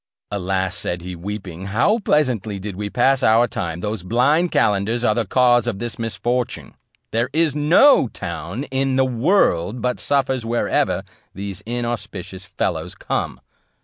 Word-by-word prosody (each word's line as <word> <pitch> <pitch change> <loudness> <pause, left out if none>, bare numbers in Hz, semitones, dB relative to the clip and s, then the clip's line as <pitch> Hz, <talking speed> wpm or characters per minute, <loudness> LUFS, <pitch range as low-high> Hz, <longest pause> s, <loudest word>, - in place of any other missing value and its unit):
"Alas!" 95 -1 -1
said 85 0 -3
he, 90 0 -6
weeping, 95 0 -6
"how 125 - +2
pleasantly 125 - 0
did 100 0 -6
we 105 +1 -4
pass 130 +4 +2
our 115 +2 +4
time! 85 -5 -4
those 105 0 -3
blind 135 - +2
calenders 115 -3 +1
are 110 - +4
the 115 -2 -1
cause 120 0 +3
of 115 -5 -1
this 120 +2 -5
misfortune; 120 +2 -2 0.4
there 115 +3 0
is 160 -2 +2
no 150 - +5
town 110 +2 -5
in 135 0 0
the 130 0 +3
world 125 - +2
but 125 +1 -1
suffers 135 -3 0
wherever 115 +1 0 0.3
these 100 -1 -6
inauspicious 105 -6 -4
fellows - - -3
come. - - -3
115 Hz, 150 wpm, -21 LUFS, 100-130 Hz, 0.4 s, no